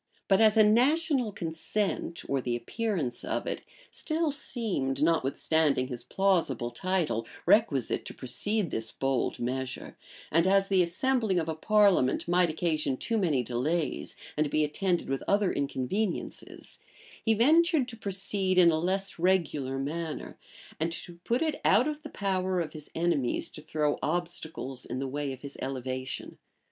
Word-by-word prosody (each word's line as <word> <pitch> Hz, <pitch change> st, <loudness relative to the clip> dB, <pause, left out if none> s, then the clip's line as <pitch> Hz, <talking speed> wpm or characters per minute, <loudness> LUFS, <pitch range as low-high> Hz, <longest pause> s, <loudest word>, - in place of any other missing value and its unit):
But 195 Hz, +2 st, +4 dB
as 220 Hz, 0 st, +5 dB
a 215 Hz, -, +8 dB
national 255 Hz, +3 st, +3 dB
consent, 170 Hz, +1 st, -3 dB
or 140 Hz, -1 st, 0 dB
the 120 Hz, -1 st, -1 dB
appearance 165 Hz, -, -2 dB
of -, -, -2 dB
it, -, -, -3 dB, 0.3 s
still 315 Hz, -1 st, 0 dB
seemed, 195 Hz, -, -2 dB
notwithstanding 155 Hz, -3 st, +2 dB
his 120 Hz, -2 st, -5 dB
plausible 165 Hz, -11 st, +1 dB
title, 155 Hz, -6 st, -1 dB, 0.2 s
requisite 160 Hz, -, +3 dB
to -, -, -5 dB
precede 170 Hz, -, -1 dB
this 110 Hz, 0 st, -2 dB
bold 135 Hz, -1 st, -1 dB
measure, 130 Hz, +1 st, -4 dB, 0.4 s
and 165 Hz, +3 st, +3 dB
as 195 Hz, 0 st, +3 dB
the 190 Hz, -2 st, +4 dB
assembling 215 Hz, +3 st, +1 dB
of 165 Hz, -2 st, 0 dB
a 160 Hz, -, -1 dB
parliament 200 Hz, -6 st, +3 dB
might 175 Hz, 0 st, +3 dB
occasion 155 Hz, -4 st, -1 dB
too 230 Hz, -, -1 dB
many 150 Hz, -10 st, +1 dB
delays, 140 Hz, +8 st, -1 dB, 0.2 s
and 150 Hz, -1 st, +1 dB
be 155 Hz, +1 st, +2 dB
attended 175 Hz, +4 st, 0 dB
with 135 Hz, 0 st, -1 dB
other 200 Hz, -1 st, +3 dB
inconveniences, 140 Hz, -, -3 dB, 0.4 s
he 225 Hz, -1 st, +3 dB
ventured 310 Hz, -, +4 dB
to 235 Hz, -, -5 dB
proceed 195 Hz, -2 st, 0 dB
in 175 Hz, -2 st, +7 dB
a 155 Hz, -, +1 dB
less 190 Hz, +2 st, 0 dB
regular 160 Hz, -7 st, +1 dB
manner, 155 Hz, +4 st, -4 dB, 0.4 s
and 165 Hz, +2 st, 0 dB
to 170 Hz, +1 st, -8 dB
put 240 Hz, +6 st, +1 dB
it 310 Hz, -2 st, -2 dB
out 250 Hz, +6 st, +5 dB
of 305 Hz, 0 st, -3 dB
the -, -, -8 dB
power 185 Hz, -2 st, -1 dB
of 160 Hz, -3 st, -3 dB
his 155 Hz, -2 st, -9 dB
enemies 160 Hz, -7 st, 0 dB
to 155 Hz, -, -9 dB
throw 150 Hz, -1 st, -1 dB
obstacles 160 Hz, -6 st, -3 dB
in -, -, -5 dB
the 135 Hz, +1 st, -2 dB
way 145 Hz, +1 st, -3 dB
of 130 Hz, -1 st, -8 dB
his 140 Hz, -1 st, -8 dB
elevation. 130 Hz, 0 st, -4 dB
170 Hz, 155 wpm, -29 LUFS, 140-200 Hz, 0.4 s, a